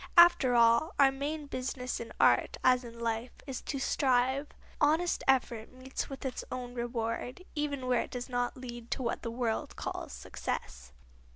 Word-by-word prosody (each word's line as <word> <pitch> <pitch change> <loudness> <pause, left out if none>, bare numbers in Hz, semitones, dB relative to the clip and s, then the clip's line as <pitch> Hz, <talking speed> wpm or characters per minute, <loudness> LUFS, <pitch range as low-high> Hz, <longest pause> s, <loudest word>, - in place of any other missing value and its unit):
After 345 -8 +7
all, 235 +6 +5
our 275 -1 +6
main 290 +3 -3
business 255 -2 -3
in 230 - -7
art, - - +4
as 255 0 +5
in 235 -1 -10
life, 230 +1 -2
is 270 -3 -5
to 280 - -3
strive. 265 +1 +2 0.3
Honest 320 +4 +3
effort 245 -4 +2
meets 255 +1 -5
with 270 0 -7
its 260 - -3
own 245 -1 -5
reward, 240 +4 -3
even 285 -3 -2
where 250 -1 +3
it - - -6
does 245 -1 -5
not 245 0 -1
lead 240 -2 -8
to 265 - -2
what 235 - -1
the 230 - -3
world 230 -1 -2
calls - - -5
success. 60 0 -5
255 Hz, 170 wpm, -31 LUFS, 235-275 Hz, 0.3 s, After